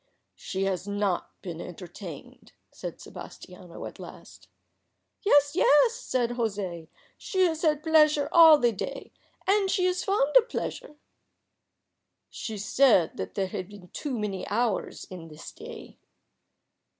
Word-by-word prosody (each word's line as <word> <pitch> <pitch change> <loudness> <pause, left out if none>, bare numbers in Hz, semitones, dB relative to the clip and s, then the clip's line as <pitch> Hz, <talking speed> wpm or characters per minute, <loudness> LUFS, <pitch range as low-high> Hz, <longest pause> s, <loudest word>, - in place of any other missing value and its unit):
"She 190 0 -4
has 195 0 -2
not 200 -3 -2
been 175 -2 -6
entertained," 175 -2 -10 0.2
said - - -7
Sebastiano 180 -1 -10
at - - -9
last. - - -12 0.7
"Yes, 290 -7 +4
yes," 370 +6 +5
said 255 - -1
José. 200 -8 -3 0.3
"She 375 -1 +1
has 320 -2 -1
had 305 -2 +1
pleasure 305 -2 +4
all 325 -3 +9
the 240 -4 +2
day. 200 - -6 0.3
And 395 0 +2
she 365 -1 +1
is 365 0 0
fond 300 -8 +1
of - - +4
pleasure." 300 - -5 1.4
"She 220 -2 -6
said 215 -4 +3 0.2
there 195 - 0
had 185 -1 -5
been 200 -4 -13
too 275 -5 -4
many 200 -3 -3
hours 230 -1 -1
in 175 -3 -8
the 155 -1 -13 0.2
day." - - -11
235 Hz, 130 wpm, -27 LUFS, 185-315 Hz, 1.4 s, all